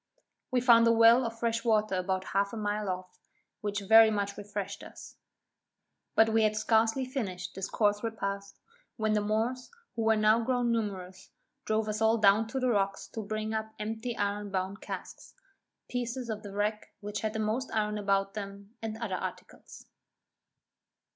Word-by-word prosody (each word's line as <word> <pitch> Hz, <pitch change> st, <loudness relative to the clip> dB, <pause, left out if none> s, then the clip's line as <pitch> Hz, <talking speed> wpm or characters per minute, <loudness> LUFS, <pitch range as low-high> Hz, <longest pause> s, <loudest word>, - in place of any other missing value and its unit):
We 255 Hz, -3 st, +1 dB
found 230 Hz, -2 st, +6 dB
a -, -, +6 dB
well 230 Hz, +2 st, +6 dB
of 230 Hz, 0 st, -7 dB
fresh 230 Hz, 0 st, -1 dB
water 215 Hz, -3 st, +2 dB
about 185 Hz, 0 st, -1 dB
a -, -, -13 dB
half 200 Hz, +1 st, 0 dB
a -, -, -4 dB
mile 210 Hz, -1 st, -2 dB
off, 185 Hz, 0 st, -5 dB, 0.4 s
which 205 Hz, -1 st, -2 dB
very 220 Hz, +2 st, +7 dB
much 200 Hz, -1 st, -1 dB
refreshed 205 Hz, -1 st, -5 dB
us. -, -, -11 dB, 1.0 s
But 225 Hz, 0 st, +5 dB
we 225 Hz, 0 st, +3 dB
had 215 Hz, -1 st, +2 dB
scarcely 225 Hz, +4 st, +2 dB
finished 195 Hz, -9 st, -4 dB
this 190 Hz, 0 st, -4 dB
coarse 205 Hz, -1 st, +1 dB
repast, 200 Hz, -3 st, -4 dB, 0.4 s
when 220 Hz, -1 st, +1 dB
the 210 Hz, -, +2 dB
Moors, 225 Hz, +5 st, -1 dB, 0.3 s
who 230 Hz, -, -2 dB
were 220 Hz, 0 st, +4 dB
now 215 Hz, +1 st, +4 dB
grown 245 Hz, -1 st, +1 dB
numerous, 190 Hz, -5 st, -4 dB, 0.4 s
drove 215 Hz, 0 st, 0 dB
us 215 Hz, 0 st, -3 dB
all 220 Hz, +1 st, +4 dB
down 210 Hz, +1 st, +4 dB
to 265 Hz, +4 st, -3 dB
the 255 Hz, -1 st, +1 dB
rocks 195 Hz, -2 st, 0 dB
to 220 Hz, -, -5 dB
bring 215 Hz, +1 st, -3 dB
up 220 Hz, 0 st, -4 dB
empty 220 Hz, +3 st, -4 dB
iron 205 Hz, 0 st, -1 dB
bound 190 Hz, +1 st, -3 dB
casks, -, -, -8 dB, 0.5 s
pieces 245 Hz, -1 st, -3 dB
of 215 Hz, -1 st, -4 dB
the 205 Hz, -2 st, -9 dB
wreck 210 Hz, +2 st, -2 dB
which 205 Hz, 0 st, -4 dB
had 215 Hz, -1 st, -2 dB
the 220 Hz, -, -3 dB
most 220 Hz, +5 st, -1 dB
iron 210 Hz, -1 st, 0 dB
about 195 Hz, -1 st, +1 dB
them, 200 Hz, 0 st, -8 dB
and 220 Hz, -1 st, -4 dB
other 225 Hz, -4 st, -4 dB
articles. -, -, -8 dB
215 Hz, 175 wpm, -30 LUFS, 200-225 Hz, 1.0 s, very